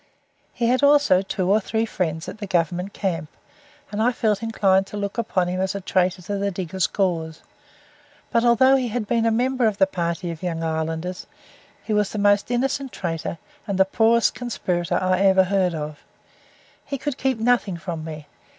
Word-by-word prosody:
He 235 - -2
had 250 +2 +2
also 285 -10 +5
two 190 -1 -2
or 210 - +5
three 220 +2 -1
friends 160 -6 -3
at - - -8
the 205 - -5
Governmnt 180 +1 0
camp, 165 -7 -3 0.6
and 210 +1 -2
I 240 +3 +3
felt 215 -4 0
inclined 195 -4 +2
to 210 - -7
look 200 +2 -3
upon 190 -6 0
him 180 +1 -2
as 190 +1 -1
a - - -2
traitor 185 -1 0
to 200 +3 -3
the 200 0 0
diggers' 185 -1 -2
cause 165 -5 -2 0.9
but 235 -1 +2
although 245 +3 +5
he 255 -2 -1
had 235 -1 -2
been 230 +2 +1
a - - +3
member 250 +1 +1
of 210 -2 -1
the 190 - +5
party 170 -1 -3
of 165 - -9
Young 165 -3 -3
Irelanders, 160 +3 -3 0.6
he 220 - -2
was 210 -1 +2
the - - -5
most 205 0 +3
innocent 265 +2 -1
traitor 165 -2 -4 0.3
and 200 -2 -1
the 190 - +5
poorest 225 +3 +3
conspirator 180 -8 -2
I 185 0 +1
ever 190 -1 +5
heard 185 -2 +1
of. 150 -1 -5 0.8
He 280 - -4
could 290 0 -4
keep 265 -2 0
nothing 225 -5 +1
from 170 -2 -5
me. 155 -2 -7
195 Hz, 190 wpm, -23 LUFS, 175-225 Hz, 0.9 s, also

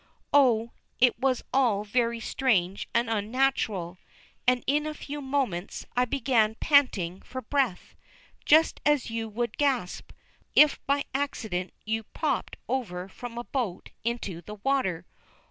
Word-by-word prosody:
Oh, 235 -5 +4 0.3
it 245 -2 +4
was 260 -1 +1
all 235 -7 +3
very 235 +2 0
strange 200 -6 0
and 235 0 +1
unnatural. 215 -5 0 0.5
And 250 -1 +3
in 295 +3 +1
a 305 - -4
few 290 0 -6
moments 265 -10 -2
I 250 0 +3
began 235 -4 +2
panting 215 - +2
for 260 - -7
breath. 260 -6 -1 0.5
Just 315 +2 +4
as 295 -5 +2
you 225 -1 -3
would 235 +1 -3
gasp, 265 -11 0 0.4
if 300 -1 +6
by 280 0 +2
accident 220 -10 -2
you 220 +1 -1
popped 220 - -2
over 185 -9 -3
from 240 +3 -8
a 240 - -3
boat 240 -9 -3
into 220 -7 -3
the 210 +4 -9
water. 200 -8 0
235 Hz, 135 wpm, -27 LUFS, 205-270 Hz, 0.5 s, if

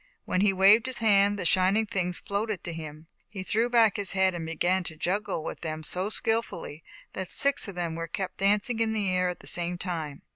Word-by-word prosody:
When 185 - 0
he 205 0 +4
waved 200 +5 +5
his 260 - -2
hand, 205 -2 +3
the 185 - -4
shining 190 +5 +3
things 180 -4 -2
floated 210 -1 -3
to 175 - -5
him. 155 -1 -8 0.2
He 195 -1 -6
threw 225 +5 +1
back 230 -4 +4
his 200 -2 +1
head 190 -1 +2
and 165 -2 -5
began 180 +3 0
to 160 - -5
juggle 180 -1 -2
with - - -6
them 155 -1 -5
so 185 +6 -1
skillfully, 225 -9 -2 0.3
that 190 -1 -4
six 280 +4 +1
of 200 - -7
them 170 -2 -3
were 165 +1 -4
kept 185 +2 -5
dancing 210 +4 +1
in 225 -1 +1
the 205 -4 0
air 180 0 +1
at 180 - -6
the - - -14
same 175 0 0
time. 160 -6 -5
190 Hz, 220 wpm, -27 LUFS, 175-210 Hz, 0.3 s, waved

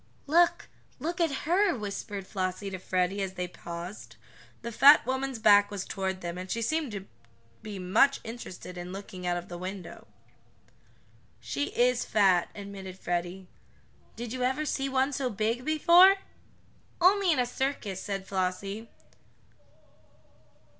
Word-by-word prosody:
"Look 340 +4 +3 0.3
look 340 +2 -3
at 290 -5 0
her," 365 +3 +3
whispered 200 -1 -5
Flossie 190 +1 -3
to 190 - -5
Freddie, 185 +2 0
as 190 -1 -3
they 180 -1 -3
paused. 175 +2 -8 0.5
The 235 - -4
fat 280 +5 +7
woman's 265 0 -2
back 205 -2 +6
was 200 -2 -5
toward 190 -2 -3
them, 175 +1 -5
and 185 +1 -7
she 230 +3 -1
seemed 310 0 -1
to 195 -2 -6 0.6
be 210 -2 -7
much 215 +10 +3
interested 185 -6 -8
in 175 +1 -7
looking 190 -2 -7
out 175 0 +1
of 175 +1 -7
the 175 -1 -7
window. 185 0 -7 1.3
"She 125 +5 -2
is 245 0 +3
fat," 190 -5 +3
admitted 195 -2 -8
Freddie. 175 +1 -3 0.7
"Did 235 0 -6
you 255 - -4
ever 260 +5 0
see 275 -2 -1
one 265 +1 +1
so 260 -1 -1
big 220 +3 -1
before?" 340 +6 +6 0.8
"Only 375 +1 +4
in 310 - +2
a 250 - +2
circus," 245 -7 -3
said 195 -2 -4
Flossie. 195 +3 -3
205 Hz, 145 wpm, -28 LUFS, 185-265 Hz, 1.3 s, fat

